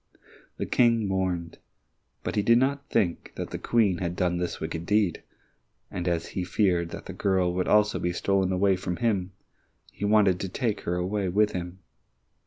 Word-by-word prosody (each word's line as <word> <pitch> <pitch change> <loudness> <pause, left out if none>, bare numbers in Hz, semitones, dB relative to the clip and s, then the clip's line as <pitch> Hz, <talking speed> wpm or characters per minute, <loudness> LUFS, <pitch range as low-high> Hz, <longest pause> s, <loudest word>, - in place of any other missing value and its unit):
The - - -2
King 115 -3 +3
mourned, 90 -3 -2 0.6
but - - -3
he 105 - +3
did 115 +3 +5
not 140 +2 0
think 95 -7 0
that - - -5
the - - -4
Queen 105 -7 +2
had 85 -1 -2
done 90 -1 0
this 90 -1 -3
wicked 80 +1 -4
deed, 105 -4 +2 0.7
and 90 0 -4
as 85 -2 -1
he 95 - -3
feared 90 -2 +1
that - - -8
the - - -7
girl 95 -2 +1
would 90 0 -1
also 105 0 +3
be 90 - -1
stolen 95 +1 +1
away 95 +1 +3
from 90 -1 -3
him, 100 -6 0 0.6
he - - -9
wanted 100 -3 +4
to 95 - -3
take 110 +2 -2
her 90 - 0
away 95 +2 -1
with 105 +3 +2
him. 90 +1 -6
95 Hz, 185 wpm, -27 LUFS, 90-105 Hz, 0.7 s, did